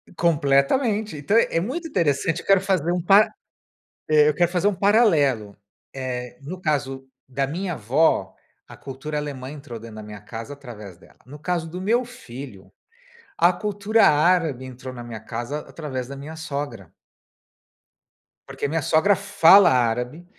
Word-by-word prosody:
Completamente. 170 - +1
Então 150 +9 -1
é 195 -7 +2
muito 270 - -4
interessante 165 - 0
eu - - -19
quero 195 -1 +4
fazer 185 -4 0
um 175 0 0
para 195 +4 +5 0.8
eu 150 -1 +4
quero 175 +3 +1
fazer 180 +2 +1
um 205 - +2
paralelo. 160 - +2 0.4
Eh, 125 -2 -5
no 175 +7 -7
caso 135 -5 -2 0.2
da 135 +1 -1
minha 175 +6 -4
avó, 135 +6 +1 0.3
a - - -12
cultura 140 +3 -6
alemã 135 -2 -6
entrou 140 -6 -9
dentro 115 -1 -11
da 110 - -8
minha 105 -1 -9
casa 115 +5 -8
através 105 -10 -11
dela. - - -21
No 145 +3 -10
caso 165 +1 -2
do 180 - -7
meu 225 +6 +1
filho, 130 - -11 0.7
a 175 +2 +4
cultura 210 +3 +1
árabe 155 -3 +2
entrou 130 0 -9
na 120 -1 -8
minha 115 -2 -8
casa 120 +6 -5
através 130 -6 -6
da 140 - -7
minha 150 +4 -8
sogra 140 - -6 1.6
porque - - -5
minha 160 +1 -1
sogra 170 +8 +3
fala 185 +2 +6
árabe, 125 +6 0
150 Hz, 155 wpm, -23 LUFS, 130-180 Hz, 1.6 s, fala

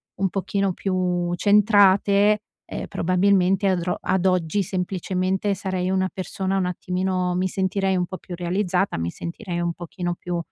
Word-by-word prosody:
un 195 - 0
pochino 195 +1 -1
più 180 -2 -1
centrate, 205 0 +4 0.3
ehm, - - -6
probabilmente 190 +2 +2
adro 180 -1 0
ad 190 0 0
oggi 185 0 +2
semplicemente 185 +1 -1
sarei 185 -1 -2
una 190 0 +1
persona 190 +1 -2
un 190 - +1
attimino, 180 0 -1
mi 185 +1 +1
sentirei 190 +1 0
un 180 -1 0
po' 185 - -6
più 180 - -8
realizzata, 180 +2 0
mi 85 0 -2
sentirei 170 - -5
un 170 0 0
pochino 175 +1 -4
più, 175 0 -4
185 Hz, 150 wpm, -23 LUFS, 180-195 Hz, 0.3 s, centrate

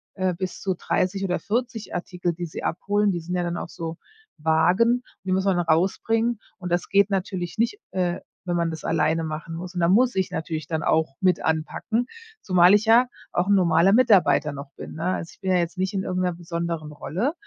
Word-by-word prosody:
äh, 185 -2 0
bis 185 +1 -5
zu 190 -2 -1
30 185 +3 -1
oder 180 -1 -1
40 235 -1 -3
Artikel, 175 -1 -2
die 175 +1 -5
sie 155 - -7
abholen. 205 +4 +1
Die 175 - -2
sind 175 +2 -6
ja 180 - +1
dann 175 0 -2
auch - - -5
so 165 -2 -6 0.4
Wagen, 180 +10 +3 0.2
die 185 - -2
muss 190 +1 +1
man 190 -2 +2
rausbringen. 205 +7 +1 0.2
Und 180 -1 -5
das 175 - 0
geht 200 +1 +4
natürlich 190 -1 -3
nicht, 235 - +1
äh, 180 -2 -1 0.3
wenn 175 -1 -1
man 170 -1 0
das 160 - -7
alleine 165 +1 +1
machen 160 +1 -5
muss. 180 +2 -7
Und 175 - -1
da 170 - +3
muss 245 +4 +4
ich 190 -1 0
natürlich 160 -1 -4
dann 160 -1 -2
auch 155 -4 +1
mit 185 -3 +2
anpacken, 160 +9 -1 0.3
zumal 180 0 +5
ich 210 +2 +2
ja 235 +3 +6 0.3
auch 175 +2 +1
'n - - +5
normaler 180 0 +4
Mitarbeiter 205 - +4
noch 140 0 -8
bin. - - -8
Ne, 160 - -5
also, 165 - -6
ich - - -24
bin 190 -1 0
ja 185 - +4
jetzt 170 +2 -2
nicht 190 +2 -1
in 190 - -1
irgend 185 0 -2
'ner 180 - +1
besonderen 170 -2 -4
Rolle, 210 - -2
180 Hz, 215 wpm, -24 LUFS, 165-200 Hz, 0.4 s, ja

